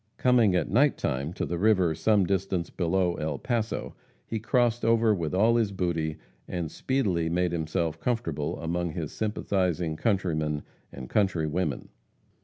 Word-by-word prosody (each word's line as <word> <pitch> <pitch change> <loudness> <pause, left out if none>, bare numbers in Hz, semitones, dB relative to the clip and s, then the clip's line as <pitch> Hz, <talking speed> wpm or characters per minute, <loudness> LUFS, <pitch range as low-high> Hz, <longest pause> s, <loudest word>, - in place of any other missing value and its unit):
Coming 120 -7 +4
at 90 - +1
night 140 +7 +4
time 70 +4 -2
to - - -2
the 85 0 -3
river 95 -5 +3
some 105 +3 +3
distance 95 -2 -1
below 90 0 0
El 75 -2 -2
Paso, 115 - -2 0.3
he 110 - -3
crossed 120 +1 +1
over 115 -1 +4
with 85 -4 -2
all 115 +5 +4
his 110 -4 +1
booty, 85 -5 -1 0.3
and 85 -4 -3
speedily 95 -12 0
made 90 +1 +1
himself 80 -1 -2
comfortable 80 - -2
among 85 0 -2
his 80 -3 -4
sympathizing 90 -6 -1
countrymen 80 -7 0 0.3
and 65 -2 -8
countrywomen. 85 - 0
90 Hz, 145 wpm, -27 LUFS, 80-110 Hz, 0.3 s, Coming